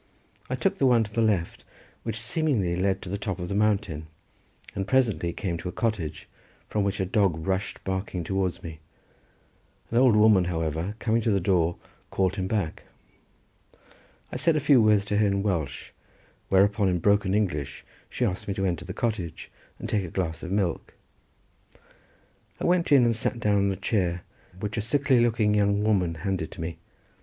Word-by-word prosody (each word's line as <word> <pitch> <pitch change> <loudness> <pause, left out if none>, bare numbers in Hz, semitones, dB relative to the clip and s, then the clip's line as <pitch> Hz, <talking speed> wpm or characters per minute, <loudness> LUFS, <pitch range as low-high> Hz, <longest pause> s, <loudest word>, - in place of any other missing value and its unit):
I - - 0
took - - 0
the 135 - +4
one 120 -3 +4
to 105 -1 -9
the 115 - +1
left, 100 -7 0 0.4
which 110 -1 -4
seemingly 115 - 0
led 95 +1 0
to - - -7
the 100 +2 -3
top 100 -1 -3
of 90 -1 -5
the - - -2
mountain, 100 -7 0 0.7
and 95 -1 -3
presently 110 -10 +2
came 85 -1 -3
to 90 - -4
a - - -5
cottage 110 -10 -3 0.4
from 105 - 0
which 100 -1 -1
a 95 - +1
dog 95 -5 +1
rushed 95 +1 -2
barking 95 -2 -3
towards 95 +1 -2
me; 80 -2 -8 1.1
an 115 - +3
old 125 -4 +5
woman, 105 -4 +5
however, 80 +3 -2
coming 115 0 +1
to 115 - 0
the 100 -2 +3
door, 85 -2 +2 0.3
called 95 +1 0
him 95 -1 -1
back. 95 -6 -2 1.5
I - - -3
said 165 - +2
a - - +3
few 140 -3 +5
words 105 -2 +4
to 105 0 0
her 105 0 +3
in 100 0 0
Welsh, 85 -9 -2 0.6
whereupon 100 +1 +3
in 90 - +1
broken 100 +2 +2
English 90 -10 -2 0.2
she 125 - -1
asked 90 -4 -3
me 100 - -2
to 95 -1 -1
enter 85 -2 -2
the 95 - -7
cottage 95 -9 -3 0.3
and - - -6
take 105 -2 0
a - - -5
glass 80 -2 -3
of 90 - -6
milk. 95 -3 -1 1.6
I - - -2
went 175 -2 +2
in 135 -4 +7
and 115 -1 +2
sat 115 +2 -2
down 105 -3 +2
on 100 - +1
a - - -2
chair 90 -3 -1 0.4
which 105 +3 -4
a - - +1
sickly 130 +3 +2
looking 115 -3 +2
young 100 0 +2
woman 95 -6 +1
handed 85 0 -2
to - - -8
me. 80 0 -5
100 Hz, 185 wpm, -26 LUFS, 90-110 Hz, 1.6 s, in